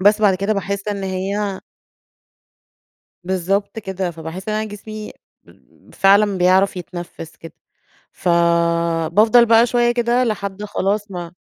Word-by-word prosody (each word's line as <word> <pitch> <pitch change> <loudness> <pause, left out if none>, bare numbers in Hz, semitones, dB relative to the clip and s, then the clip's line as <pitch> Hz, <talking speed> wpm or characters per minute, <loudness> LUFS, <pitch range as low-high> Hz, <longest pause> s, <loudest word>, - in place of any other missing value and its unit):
بس 210 +2 +4
بعد 205 -3 +4
كده 200 +3 -1
باحس 200 0 -3
إن 200 -1 -3
هي 195 +1 -3 1.6
بالضبط 190 +4 -1
كده، 190 -3 -4
فباحس 165 +5 -7
إن - - -1
أنا 215 - -1
جسمي 215 +1 -8 0.8
فعلًا 200 0 +4
بيعرف 185 +2 +3
يتنفِّس 175 -2 -8
كده، 165 - -12 0.6
فبافضل 170 +5 +2
بقى 230 0 +5
شوية 240 0 +2
كده 240 +1 +1
لحد 205 -3 -3
خلاص 205 0 -2
ما 175 -2 -6
195 Hz, 120 wpm, -19 LUFS, 180-210 Hz, 1.6 s, بقى